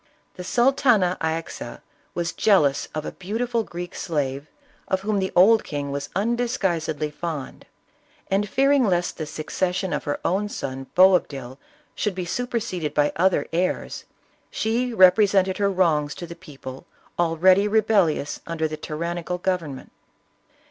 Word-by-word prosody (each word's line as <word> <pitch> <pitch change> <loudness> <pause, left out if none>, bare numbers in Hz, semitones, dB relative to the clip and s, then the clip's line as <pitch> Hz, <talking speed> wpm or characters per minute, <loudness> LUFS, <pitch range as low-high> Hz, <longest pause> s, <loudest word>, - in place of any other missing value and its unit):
The 180 - -8
Sultana 240 -5 +3
Ayxa 160 +1 -4 0.3
was 170 -1 -2
jealous 150 -10 +3
of 155 0 -3
a - - -4
beautiful 230 +5 -2
Greek 175 -1 -7
slave, 145 -3 -3 0.4
of 190 - 0
whom 205 0 0
the 190 0 -1
old 215 +5 +6
king 145 -1 -4
was 140 0 -4
undisguisedly 190 -9 -1
fond, 155 -3 -6 0.6
and 200 +1 0
fearing 275 +3 +3
lest 175 -5 0
the 155 - -3
succession 180 +4 -2
of - - -3
her 145 - -2
own 200 +4 0
son 135 -6 -5
Boabdil 145 -9 +3 0.3
should 210 -3 -2
be 185 -1 -3
superseded 210 -6 -3
by 145 0 +3
other 185 +2 +2
heirs, 180 +2 -2 0.4
she 235 +3 -1
represented 190 -1 +4
her 200 -1 +2
wrongs 160 -6 +1
to 175 - -7
the 170 0 -9
people 135 -6 -10 0.3
already 180 +4 +4
rebellious 205 -9 +2
under 165 -1 -1
the 155 0 -6
tyrannical 170 +3 -4
government. 175 -7 -3
180 Hz, 135 wpm, -24 LUFS, 155-205 Hz, 0.6 s, old